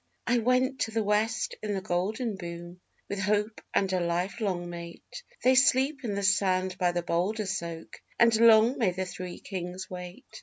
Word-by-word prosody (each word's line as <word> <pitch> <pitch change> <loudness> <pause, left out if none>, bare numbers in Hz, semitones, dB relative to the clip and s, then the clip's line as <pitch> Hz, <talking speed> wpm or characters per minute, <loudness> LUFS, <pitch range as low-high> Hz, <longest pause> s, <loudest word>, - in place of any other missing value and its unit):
'I 240 0 +2
went 255 +3 +1
to 225 - 0
the 225 0 0
West 215 +3 0
in 210 -1 -2
the - - -1
golden 200 +6 -1
boom, 175 -1 -8 0.3
with 200 - -4
Hope 210 +2 0
and 195 -1 +1
a 185 - +2
life 175 +6 -2
long 180 -4 -1
mate, 170 - -9 0.2
'They 255 - +5
sleep 265 +2 +3
in 210 -4 -2
the 200 - -2
sand 185 -1 +2
by 180 -2 +2
the 175 0 -2
Boulder 190 +6 -1
Soak, 170 -4 -5 0.2
and 230 -1 +5
long 230 +2 +6
may 220 -6 +3
the 185 +1 -3
Three 180 -1 -7
Kings 185 -1 -6
wait. 180 +7 -8
195 Hz, 185 wpm, -28 LUFS, 180-225 Hz, 0.3 s, long